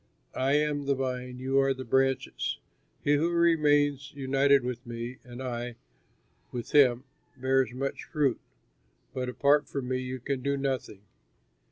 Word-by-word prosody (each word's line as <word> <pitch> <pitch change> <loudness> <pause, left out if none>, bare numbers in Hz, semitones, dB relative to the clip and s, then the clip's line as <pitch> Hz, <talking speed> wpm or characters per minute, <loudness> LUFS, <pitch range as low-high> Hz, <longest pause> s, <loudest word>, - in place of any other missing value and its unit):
I 135 +2 +1
am 145 -1 +1
the 140 - +3
vine, 125 -1 -3
you 135 +2 +1
are 135 0 +2
the 130 0 -7
branches. 135 +2 0 0.5
He 145 0 +4
who 165 +4 +1
remains 145 -4 +3
united 135 0 +3
with 125 0 -4
me 120 +1 -6
and 125 +1 -8
I 120 -1 -4 0.8
with 120 -2 -5
him 130 -4 +5 0.3
bears 130 -1 +2
much 135 +2 -4
fruit, 145 -6 0 0.7
but 125 -1 -2
apart 145 +3 +3
from 135 -3 -4
me 130 0 0
you 130 0 -5
can 130 +2 -3
do 140 +1 0
nothing. 130 -7 -3
135 Hz, 150 wpm, -28 LUFS, 125-140 Hz, 0.8 s, him